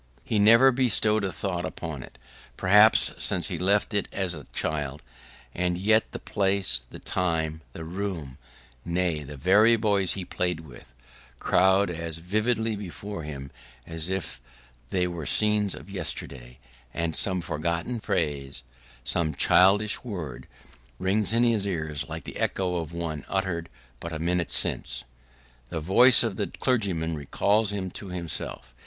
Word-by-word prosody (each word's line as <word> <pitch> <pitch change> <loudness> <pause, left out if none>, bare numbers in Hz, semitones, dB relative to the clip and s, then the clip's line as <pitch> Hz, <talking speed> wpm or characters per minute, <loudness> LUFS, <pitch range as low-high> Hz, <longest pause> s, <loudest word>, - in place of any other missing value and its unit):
He 110 - -1
has - - +4
never 115 +5 +7
bestowed 110 -4 +3
a 95 - -1
thought 90 -3 -3
upon 80 -5 -6
it, - - -13 0.4
perhaps, 105 +4 +5
since 95 0 0
he 85 -4 -4
left 100 +4 +2
it 100 - +1
as 95 -3 -1
a 75 -4 -9
child: 75 -2 -3 0.5
and 90 0 -1
yet 110 +4 +2
the - - -5
place, 95 -11 +2
the - - -10
time, 80 -3 -1
the 80 - -7
room 85 -6 -5 0.4
nay, 85 -2 -1
the 75 0 -9
very 105 - +5
boys 100 -4 +2
he 95 -2 -5
played 90 -3 -2
with, 60 -4 -15 0.4
crowd 95 +4 +3
as 85 -1 -5
vividly 110 +5 0
before 100 -1 -7
him 70 -3 -7 0.3
as 80 +1 -4
if 95 -10 -3 0.5
they 90 -1 0
were 85 -4 -5
scenes 105 -2 +2
of - - -11
yesterday; 60 -1 -6 0.4
and 85 -1 -1
some 95 -2 +3
forgotten 85 +8 -3
phrase, 70 - -2 0.4
some 80 +2 0
childish 100 +7 +4
word, 90 - -6 0.5
rings 100 +3 +1
in 115 +1 +3
his 110 -4 +2
ears 80 -6 -2
like - - -6
the - - -8
echo 90 -2 -1
of 80 -2 -4
one 80 -4 -4
uttered 95 -4 -2 0.3
but 85 - -7
a 80 - -4
minute 85 +1 -1
since. - - 0 0.7
The 80 - -3
voice 120 +12 +7
of 110 -5 -2
the - - -1
clergyman 95 -10 -1
recalls 100 +8 +1
him 95 -3 -4
to 100 - -7
himself. 85 -7 -5
90 Hz, 150 wpm, -26 LUFS, 80-100 Hz, 0.7 s, never